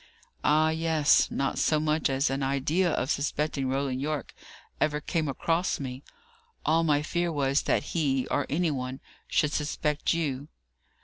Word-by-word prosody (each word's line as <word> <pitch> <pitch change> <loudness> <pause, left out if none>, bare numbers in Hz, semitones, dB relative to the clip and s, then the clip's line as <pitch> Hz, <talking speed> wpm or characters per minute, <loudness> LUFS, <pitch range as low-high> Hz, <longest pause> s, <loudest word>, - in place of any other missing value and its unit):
"Ah, 155 +1 +4
yes. 160 -2 +3
Not 135 0 -1
so 155 - +2
much 155 0 +1
as 135 +1 +1
an 135 +1 -2
idea 140 +7 +1
of 130 -3 -1
suspecting 140 -1 -1
Roland 135 -1 -1
Yorke 150 -2 -3 0.5
ever 150 -1 +1
came 155 +1 -1
across 165 +6 0
me. 130 -1 -5 0.6
All 165 +1 +3
my 150 -2 +2
fear 175 +2 -1
was, 140 -2 +1
that - - +1
he, 135 -6 +1
or 145 - 0
any 165 +2 +1
one, 130 -1 -4 0.3
should 150 - +1
suspect 150 0 -1
you." 145 -4 -1
150 Hz, 150 wpm, -28 LUFS, 135-155 Hz, 0.6 s, Ah